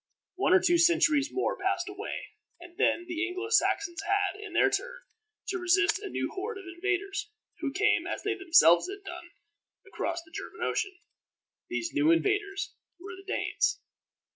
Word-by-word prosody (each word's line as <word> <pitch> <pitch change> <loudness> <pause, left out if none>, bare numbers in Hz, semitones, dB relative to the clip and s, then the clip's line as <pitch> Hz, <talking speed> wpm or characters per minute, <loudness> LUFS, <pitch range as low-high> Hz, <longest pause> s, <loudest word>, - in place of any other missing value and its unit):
One 370 -1 +1
or - - +7
two 345 -2 +3
centuries 310 -4 +4
more 385 - 0
passed - - 0
away, 390 +1 -6 0.3
and 350 0 -13
then 350 -4 +1
the 345 -1 -2
Anglo 370 +4 -5
Saxons 400 -5 +2
had, 400 0 0
in 420 - -8
their - - +4
turn, - - -3 0.5
to 375 - -1
resist 385 +2 +3
a 405 -1 -6
new - - -3
horde 420 +3 -4
of 390 - -9
invaders, 390 +3 -2 0.3
who 290 -4 -2
came, 420 +8 +2
as - - -4
they 415 - 0
themselves 335 - +5
had 400 +1 -8
done, 345 -2 -8 0.6
across 340 -2 -3
the 320 - -21
German - - -7
Ocean. 390 -3 -1 0.7
These 340 - -3
new 300 +1 +3
invaders 400 +3 +1 0.3
were 375 +1 -8
the 390 +1 -9
Danes. - - 0
380 Hz, 165 wpm, -29 LUFS, 345-400 Hz, 0.7 s, or